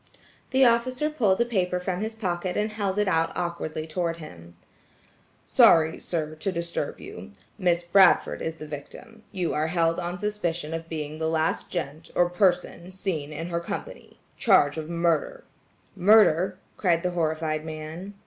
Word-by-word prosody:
The 265 0 +4
officer 255 +5 +2
pulled 215 -10 +2
a - - +3
paper 180 -6 0
from 180 +1 -3
his 220 +1 -3
pocket 180 -4 -2
and 210 +1 0
held 200 -2 -2
it 210 -1 +2
out 165 -3 +2
awkwardly 170 -3 -3
toward 165 +1 -2
him: 85 - -12 0.9
"Sorry, 160 -1 +5
sir, 155 -3 -3
to 155 +5 -3
disturb 170 -1 -3
you. 95 +2 -10 0.3
Miss 175 -1 +2
Bradford 185 +1 +4
is 160 0 -3
the 155 - -9
victim; 185 - -10
you 180 -5 -2
are 155 +1 0
held 165 0 +1
on 175 0 -4
suspicion 170 -6 -2
being 155 -1 -5
the 160 0 0
last 160 0 0
gent, 160 -2 -5
or 175 0 +3
person, 180 -1 0
seen 180 -6 -4
in 165 +3 -5
her 170 -1 -1
company. 170 - -7 0.2
Charge 145 0 +4
of 155 0 -6
murder!" 170 - 0 0.5
"Murder!" 190 -2 +5 0.2
cried 170 -3 +1
the 180 - 0
horrified 160 -2 -1
man. 160 +5 -7
175 Hz, 160 wpm, -26 LUFS, 160-190 Hz, 0.9 s, Sorry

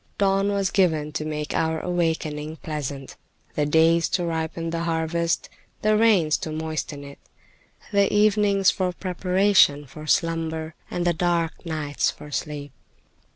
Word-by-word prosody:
Dawn 195 0 +2
was 200 -1 0
given 160 -6 +2
to 155 0 -3
make 150 -1 -3
our 160 0 0
awakening 160 -3 -2
pleasant, 145 -3 -5 0.4
the 150 -1 0
days 165 +2 +4
to 175 - 0
ripen 165 0 -3
the 165 0 -2
harvest, 165 0 0 0.4
the 215 0 +4
rains 205 -9 +4
to 160 - -5
moisten 155 -2 -4
it, 140 0 -11 0.7
the 200 -1 +3
evenings 205 -2 +4
for 185 -1 -1
preparation 180 -4 +3
for 155 +3 -11
slumber, 160 0 0 0.2
and 175 - -2
the 175 - +3
dark 170 0 -1
nights 150 -3 -1
for 150 - -9
sleep. 145 -1 -4
165 Hz, 140 wpm, -24 LUFS, 155-180 Hz, 0.7 s, days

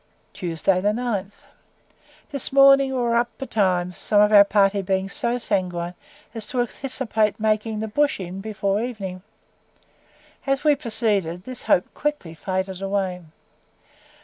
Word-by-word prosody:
THURSDAY, 180 +1 0
9. 215 -5 -2 1.0
This 280 -3 -3
morning 275 0 +6
we 260 - -2
were 240 -1 +1
up 235 0 +2
betimes, 185 -8 0
some 205 - +2
of 210 0 +5
our 200 -1 +10
party 200 0 +2
being 190 0 -1
so 235 +5 -2
sanguine 180 -6 -1 0.4
as 225 -3 -6
to 255 - -2
anticipate 240 -4 -1
making 215 0 0
the 220 - -3
"Bush 285 +5 +1
Inn" 185 +1 -6
before 200 -1 -1
evening. 200 -7 -5 1.3
As 275 0 0
we 300 -1 +4
proceeded, 210 - 0
this 255 +2 -5
hope 180 - +1
quickly 295 - -3
faded 190 +2 -3
away. 195 -2 -2
210 Hz, 135 wpm, -23 LUFS, 190-240 Hz, 1.3 s, our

